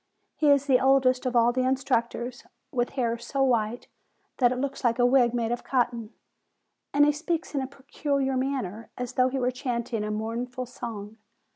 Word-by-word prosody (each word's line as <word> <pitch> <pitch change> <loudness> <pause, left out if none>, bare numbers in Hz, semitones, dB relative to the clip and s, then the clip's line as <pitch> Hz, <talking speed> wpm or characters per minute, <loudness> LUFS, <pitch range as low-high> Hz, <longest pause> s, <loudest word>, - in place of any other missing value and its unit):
He 300 - +2
is 280 -1 +4
the 260 -3 +4
oldest 260 -1 +3
of 250 - -2
all 235 0 +5
the 255 - +1
instructors, 255 -2 -1 0.3
with 245 -1 0
hair 235 -2 0
so 270 +3 -1
white 235 -2 0 0.5
that 245 -2 +5
it 255 - -1
looks 275 +1 -3
like 235 -1 +2
a 245 - +4
wig 245 -1 +4
made 235 -1 -1
of 240 - -2
cotton; 240 -4 -1 0.8
and 290 +1 +5
he 295 - +4
speaks 325 +3 -3
in 280 - 0
a 265 - -3
peculiar 275 0 -2
manner, 255 -6 -2
as 250 -1 -4
though 255 0 +3
he 270 - -3
were 250 -1 +1
chanting 240 -3 -3
a 210 - -3
mournful 235 +4 -3
song. 220 -3 -7
250 Hz, 185 wpm, -27 LUFS, 235-270 Hz, 0.8 s, all